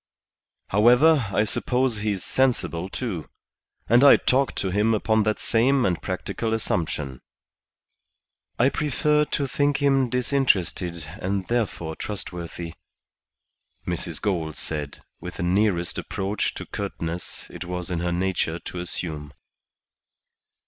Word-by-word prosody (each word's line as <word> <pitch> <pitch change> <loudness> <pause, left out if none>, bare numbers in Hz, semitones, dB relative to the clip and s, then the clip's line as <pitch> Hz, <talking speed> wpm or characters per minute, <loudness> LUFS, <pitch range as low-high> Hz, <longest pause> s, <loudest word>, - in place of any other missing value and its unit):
However, 125 +6 +5
I 100 - +3
suppose 125 +2 +1
he's 105 -3 -1
sensible, 115 -9 0
too. 95 - -4 0.6
And 120 +4 +5
I 140 - +9
talked 135 +1 +1
to 95 - -1
him 105 +4 +3
upon 110 +1 +2
that 110 0 +1
sane 125 +3 +3
and 90 -2 0
practical 110 +4 -2
assumption." 75 - -2 1.4
"I 125 +3 +4
prefer 150 +1 +1
to 145 - -1
think 145 +1 +1
him 135 -3 +3
disinterested, 100 - +1 0.2
and 95 0 -1
therefore 100 -9 -1
trustworthy," 85 -4 -6 1.1
Mrs. - - -3
Gould 80 -7 -1
said, 75 -3 -4 0.2
with - - -7
the - - -3
nearest 90 -1 +1
approach 95 +2 -2
to - - -6
curtness 85 +2 -5
it - - -7
was 90 0 -4
in 85 - -1
her 85 +1 -1
nature 90 -2 0
to 90 - -7
assume. 80 -4 -4
100 Hz, 120 wpm, -25 LUFS, 85-125 Hz, 1.4 s, I